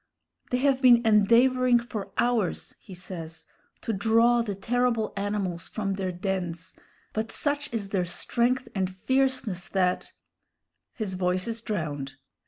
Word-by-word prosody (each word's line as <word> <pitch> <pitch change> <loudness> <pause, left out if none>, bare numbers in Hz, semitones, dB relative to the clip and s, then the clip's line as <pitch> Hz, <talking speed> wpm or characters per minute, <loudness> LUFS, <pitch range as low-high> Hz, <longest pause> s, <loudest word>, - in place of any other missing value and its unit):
"They 250 - +1
have 265 0 +2
been 240 -2 +6
endeavoring 240 +4 +5
for 230 -4 -5
hours," 235 -6 0
he 190 - -11
says, 170 -3 -8 0.4
"to 225 - -2
draw 230 +4 +3
the 210 -4 -3
terrible 235 +2 0
animals 200 -4 -3
from 200 -3 -2
their 190 -1 -2
dens, 180 -2 -4 0.4
but 220 +1 -2
such 290 0 0
is 215 -4 -3
their 190 -3 0
strength 240 +8 0
and 190 -2 0
fierceness, 235 -2 0
that 185 -2 0 0.4
" - - -56
His 210 -4 -3
voice 185 +1 0
is 230 0 -4
drowned. 150 - -4
210 Hz, 140 wpm, -27 LUFS, 185-240 Hz, 0.4 s, been